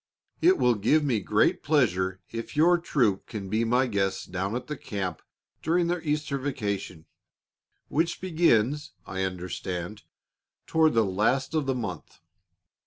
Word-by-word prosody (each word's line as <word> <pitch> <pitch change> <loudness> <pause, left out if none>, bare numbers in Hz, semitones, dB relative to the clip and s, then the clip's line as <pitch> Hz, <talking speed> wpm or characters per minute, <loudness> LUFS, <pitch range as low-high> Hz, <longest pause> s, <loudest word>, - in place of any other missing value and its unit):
It 370 +2 +5
will 125 - +4
give 120 +9 +2
me 125 -7 +1
great 95 - +2
pleasure 95 - +1
if 115 +5 -6
your 170 +3 +5
troop 120 - +1
can 100 -4 -6
be 110 +3 +1
my 125 +3 +2
guests 95 -4 -1
down 95 +4 -3
at 125 - -4
the 150 - -4
camp 95 - -4 0.4
during 170 +2 +2
their 175 0 -1
Easter 150 -2 -1
vacation, 100 - -4 0.8
which 165 +2 0
begins, 150 -4 +1
I 95 0 -4
understand, 90 +2 -5 0.6
toward 160 -3 +3
the 115 -1 +4
last 110 +9 0
of 155 -4 0
the 135 - +1
month. 100 -9 -6
120 Hz, 145 wpm, -27 LUFS, 95-150 Hz, 0.8 s, It